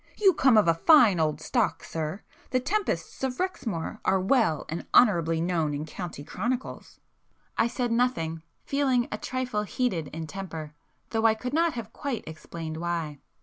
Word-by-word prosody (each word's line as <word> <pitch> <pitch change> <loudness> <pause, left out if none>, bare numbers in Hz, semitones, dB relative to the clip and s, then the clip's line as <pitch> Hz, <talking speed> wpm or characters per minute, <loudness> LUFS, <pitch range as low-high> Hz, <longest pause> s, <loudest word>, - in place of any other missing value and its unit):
You 390 -3 +5
come 260 -6 +4
of 210 - +5
a 165 - +6
fine 240 - +7
old 155 -2 +1
stock, 235 +7 0
sir!—the 165 +10 -4
Tempests 395 0 -2
of 255 -1 -2
Rexmoor 225 - -3
are 190 0 +3
well 190 - +2
and 165 +2 -5
honourably 170 -8 +5
known 165 -4 0
in 150 +2 -4
county 165 -2 -7
chronicles." 240 - -4 0.6
I - - +3
said 245 0 -2
nothing, 200 -10 0 0.2
feeling 265 -4 +1
a 215 - -3
trifle 255 -4 -2
heated 205 - -1
in 160 0 -6
temper, 160 -4 -7 0.4
though 225 0 +3
I 220 - +3
could 250 +4 -5
not 330 +1 +2
have 225 -2 -6
quite 270 -6 -3
explained 160 0 -7
why. 165 -4 -3
210 Hz, 160 wpm, -27 LUFS, 165-250 Hz, 0.6 s, fine